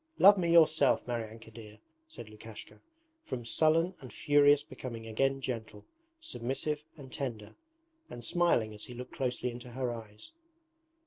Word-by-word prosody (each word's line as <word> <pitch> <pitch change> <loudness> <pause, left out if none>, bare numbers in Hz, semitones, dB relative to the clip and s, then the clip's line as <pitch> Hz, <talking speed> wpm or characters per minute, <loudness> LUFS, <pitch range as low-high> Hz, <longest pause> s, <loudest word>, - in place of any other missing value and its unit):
Love 200 +2 +9
me 175 -3 0
yourself, 155 -4 +5
Maryanka 115 -1 -5
dear,' 110 -1 -12 0.3
said 320 - -9
Lukashka, 110 0 -11 0.4
from 120 - -5
sullen 160 +8 +3
and 130 - -10
furious 145 -1 +4
becoming 125 -4 -8
again 135 +5 0
gentle, 115 -4 -5 0.3
submissive, 145 - -3
and 130 -3 -12
tender, 115 -7 -5 0.6
and 120 - -8
smiling 120 -7 +2
as 105 - -8
he 125 - -10
looked 125 +1 -8
closely 125 -1 -2
into 120 0 -10
her 125 -1 -2
eyes. 110 - -9
125 Hz, 140 wpm, -31 LUFS, 115-145 Hz, 0.6 s, Love